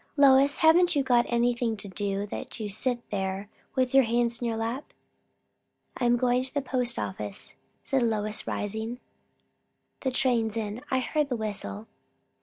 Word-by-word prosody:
Lois, 280 Hz, 0 st, +6 dB
haven't 345 Hz, +2 st, +5 dB
you 280 Hz, -, +3 dB
got 245 Hz, -2 st, +3 dB
anything 235 Hz, -1 st, +1 dB
to 200 Hz, -, -6 dB
do, 200 Hz, +1 st, -2 dB
that 210 Hz, -, -5 dB
you 215 Hz, -, -3 dB
sit 240 Hz, +4 st, -2 dB
there 195 Hz, 0 st, -2 dB, 0.3 s
with 255 Hz, -1 st, +1 dB
your 270 Hz, 0 st, +7 dB
hands 235 Hz, +1 st, 0 dB
in 240 Hz, -, 0 dB
your 225 Hz, -1 st, -1 dB
lap?" 230 Hz, +5 st, -4 dB, 1.0 s
"I 250 Hz, -, -1 dB
am 240 Hz, 0 st, +4 dB
going 250 Hz, 0 st, +2 dB
to 260 Hz, 0 st, -4 dB
the 285 Hz, -, -1 dB
post 250 Hz, -2 st, 0 dB
office," 105 Hz, 0 st, -5 dB, 0.3 s
said 270 Hz, -1 st, +1 dB
Lois, 215 Hz, -2 st, 0 dB
rising; 220 Hz, +4 st, -3 dB, 1.0 s
"the 265 Hz, -, -1 dB
train's 235 Hz, -4 st, +1 dB
in. 215 Hz, +1 st, -3 dB
I 260 Hz, -1 st, +1 dB
heard 300 Hz, +3 st, 0 dB
the 250 Hz, -, 0 dB
whistle." 215 Hz, -1 st, -5 dB
235 Hz, 165 wpm, -27 LUFS, 215-260 Hz, 1.0 s, your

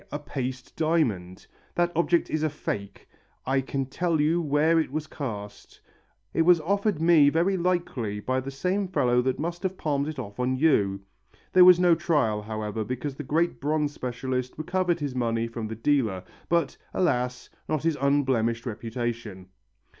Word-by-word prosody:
a -, -, -2 dB
paste 130 Hz, -3 st, -5 dB
diamond! 120 Hz, -, 0 dB, 0.3 s
That 175 Hz, 0 st, +2 dB
object 170 Hz, +1 st, +2 dB
is 155 Hz, -, 0 dB
a 155 Hz, -, +1 dB
fake. 100 Hz, -8 st, -5 dB, 0.4 s
I 135 Hz, +1 st, +2 dB
can 135 Hz, +1 st, -3 dB
tell 165 Hz, +4 st, -1 dB
you 160 Hz, +4 st, +2 dB
where 155 Hz, +2 st, +3 dB
it 155 Hz, -, -1 dB
was 155 Hz, +1 st, -3 dB
cast. 105 Hz, -10 st, -7 dB, 0.5 s
It -, -, +2 dB
was 175 Hz, +1 st, +6 dB
offered 200 Hz, +1 st, 0 dB
me 160 Hz, -3 st, +6 dB
very 170 Hz, +6 st, +2 dB
likely 170 Hz, -, -1 dB
by 130 Hz, +5 st, -1 dB
the 130 Hz, +1 st, -5 dB
same 185 Hz, +8 st, -1 dB
fellow 125 Hz, -9 st, +2 dB
that 130 Hz, 0 st, -1 dB
must 170 Hz, +3 st, -4 dB
have 190 Hz, -1 st, -2 dB
palmed 145 Hz, -2 st, -1 dB
it 155 Hz, -1 st, -5 dB
off 105 Hz, -3 st, -7 dB
on 125 Hz, +1 st, +1 dB
you...." 105 Hz, -10 st, +2 dB, 0.5 s
There 185 Hz, -1 st, +8 dB
was 180 Hz, -1 st, +8 dB
no 175 Hz, -1 st, +5 dB
trial, 150 Hz, -11 st, +1 dB
however, 110 Hz, 0 st, -4 dB
because 130 Hz, +5 st, -4 dB
the 140 Hz, -, -7 dB
great 160 Hz, +5 st, 0 dB
bronze 150 Hz, 0 st, 0 dB
specialist 125 Hz, -1 st, -3 dB
recovered 175 Hz, +2 st, 0 dB
his 145 Hz, -3 st, -3 dB
money 115 Hz, -2 st, 0 dB
from 115 Hz, -1 st, -5 dB
the 110 Hz, -, -5 dB
dealer 115 Hz, -7 st, +1 dB, 0.3 s
but, 170 Hz, -5 st, +1 dB, 0.2 s
alas! 125 Hz, -8 st, 0 dB, 0.2 s
not 155 Hz, -2 st, 0 dB
his 165 Hz, -1 st, +1 dB
unblemished 130 Hz, -5 st, +1 dB
reputation. 115 Hz, -4 st, -5 dB
140 Hz, 170 wpm, -26 LUFS, 120-165 Hz, 0.5 s, There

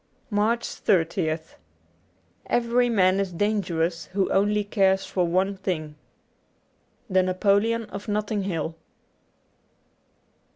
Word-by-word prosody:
95 -, -, -3 dB
MARCH 225 Hz, +3 st, +1 dB, 0.4 s
30th 160 Hz, -3 st, -3 dB, 0.9 s
EVERY 240 Hz, +1 st, +2 dB
man 190 Hz, -4 st, +3 dB
is 195 Hz, -2 st, -1 dB
dangerous 175 Hz, -4 st, -1 dB
who 195 Hz, -1 st, 0 dB
only 210 Hz, +1 st, +2 dB
cares 195 Hz, -2 st, +2 dB
for 180 Hz, -2 st, 0 dB
one 190 Hz, +3 st, +1 dB
thing. 170 Hz, -6 st, -3 dB, 0.6 s
' -, -, -42 dB
The 185 Hz, 0 st, +4 dB
Napoleon 200 Hz, +5 st, +2 dB
of 205 Hz, -2 st, -8 dB
NoUing 210 Hz, 0 st, -1 dB
Hill. 165 Hz, -4 st, -2 dB
195 Hz, 110 wpm, -25 LUFS, 180-210 Hz, 0.9 s, The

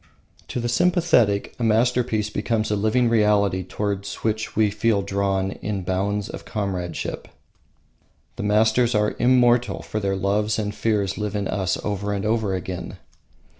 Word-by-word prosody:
To -, -, -3 dB
the 120 Hz, -, -2 dB
sympathetic 125 Hz, -, +2 dB
a -, -, -2 dB
masterpiece 115 Hz, -1 st, +1 dB
becomes 110 Hz, 0 st, -1 dB
a -, -, +2 dB
living 110 Hz, +4 st, +2 dB
reality 105 Hz, -4 st, +3 dB
towards 100 Hz, +1 st, -3 dB
which 110 Hz, 0 st, -2 dB
we 110 Hz, -2 st, +3 dB
feel 105 Hz, -1 st, +1 dB
drawn 95 Hz, -1 st, 0 dB
in 100 Hz, -2 st, -4 dB
bonds 100 Hz, +3 st, -1 dB
of -, -, -8 dB
comradeship. 90 Hz, -5 st, -4 dB, 1.1 s
The -, -, -5 dB
masters 110 Hz, +3 st, +3 dB
are 105 Hz, 0 st, +1 dB
immortal, 120 Hz, -1 st, +3 dB
for 110 Hz, -, -3 dB
their 100 Hz, -1 st, -1 dB
loves 105 Hz, +3 st, 0 dB
and 105 Hz, -1 st, -2 dB
fears 105 Hz, -3 st, -1 dB
live 105 Hz, 0 st, -3 dB
in 100 Hz, -2 st, -1 dB
us 95 Hz, -2 st, -1 dB
over 105 Hz, 0 st, -2 dB
and 100 Hz, 0 st, -3 dB
over 110 Hz, -3 st, 0 dB
again. 90 Hz, 0 st, -6 dB
105 Hz, 150 wpm, -23 LUFS, 100-110 Hz, 1.1 s, reality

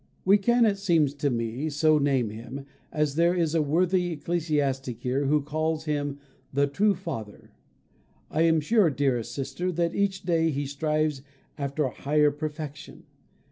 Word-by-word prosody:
We 200 Hz, +2 st, +6 dB
can, 235 Hz, +3 st, +3 dB
it 200 Hz, -2 st, +1 dB
seems 165 Hz, -8 st, +2 dB
to 145 Hz, 0 st, -1 dB
me, 120 Hz, +4 st, -2 dB
so 155 Hz, +1 st, +3 dB
name 135 Hz, -6 st, +1 dB
him, 120 Hz, +5 st, -8 dB, 0.3 s
as 150 Hz, -2 st, 0 dB
there 170 Hz, +3 st, +3 dB
is 165 Hz, -3 st, 0 dB
a 165 Hz, -, +3 dB
worthy 175 Hz, +4 st, +1 dB
ecclesiastic 145 Hz, -6 st, -1 dB
here 130 Hz, +3 st, 0 dB
who 145 Hz, +1 st, +2 dB
calls 155 Hz, +2 st, -2 dB
him 145 Hz, -2 st, -2 dB, 0.3 s
the 140 Hz, +1 st, +2 dB
true 195 Hz, +9 st, +2 dB
Father. 115 Hz, -, -7 dB, 0.8 s
I 155 Hz, -, +1 dB
am 165 Hz, -1 st, +4 dB
sure, 200 Hz, +3 st, +3 dB
dearest 130 Hz, -4 st, 0 dB
sister, 140 Hz, +8 st, -3 dB
that 170 Hz, 0 st, 0 dB
each 200 Hz, -1 st, 0 dB
day 165 Hz, -2 st, +2 dB
he 145 Hz, -1 st, -2 dB
strives 150 Hz, 0 st, -1 dB, 0.3 s
after 140 Hz, +1 st, -2 dB
a 130 Hz, -, -1 dB
higher 150 Hz, +2 st, +2 dB
perfection. 150 Hz, 0 st, -7 dB
150 Hz, 160 wpm, -26 LUFS, 140-170 Hz, 0.8 s, We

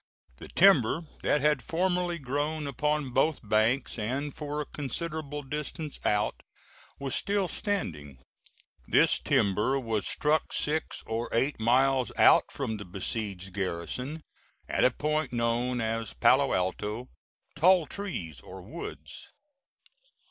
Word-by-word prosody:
The -, -, -10 dB
timber 170 Hz, -, +5 dB, 0.2 s
that 150 Hz, -, +2 dB
had 150 Hz, -2 st, +3 dB
formerly 180 Hz, 0 st, 0 dB
grown 145 Hz, +2 st, -2 dB
upon 150 Hz, 0 st, -1 dB
both 135 Hz, -2 st, +1 dB
banks, 110 Hz, +4 st, +1 dB
and 135 Hz, +7 st, -2 dB
for 150 Hz, -1 st, -4 dB
a 150 Hz, -, -2 dB
considerable 150 Hz, +1 st, -4 dB
distance 150 Hz, +2 st, -5 dB
out, 105 Hz, 0 st, +1 dB, 0.6 s
was 140 Hz, -2 st, -4 dB
still 200 Hz, -2 st, +1 dB
standing. 80 Hz, -, -3 dB, 0.7 s
This -, -, +4 dB
timber 105 Hz, +7 st, +2 dB
was 110 Hz, -5 st, -1 dB
struck 150 Hz, +1 st, +1 dB
six 155 Hz, +1 st, -1 dB
or 115 Hz, +1 st, -3 dB
eight 135 Hz, +4 st, +1 dB
miles 130 Hz, +3 st, +3 dB
out -, -, +6 dB
from 110 Hz, -, -3 dB
the 100 Hz, -, -8 dB
besieged 95 Hz, 0 st, -4 dB
garrison, 100 Hz, -, -4 dB, 0.4 s
at -, -, +1 dB
a -, -, +7 dB
point 150 Hz, +2 st, -1 dB
known 120 Hz, +1 st, 0 dB
as 115 Hz, -, -2 dB
Palo -, -, +4 dB
Alto 105 Hz, +6 st, -2 dB, 0.5 s
"Tall 175 Hz, +2 st, +5 dB
trees" 90 Hz, -, -5 dB
or 95 Hz, -1 st, -10 dB
"woods." 160 Hz, -, -8 dB
135 Hz, 125 wpm, -29 LUFS, 110-150 Hz, 0.7 s, a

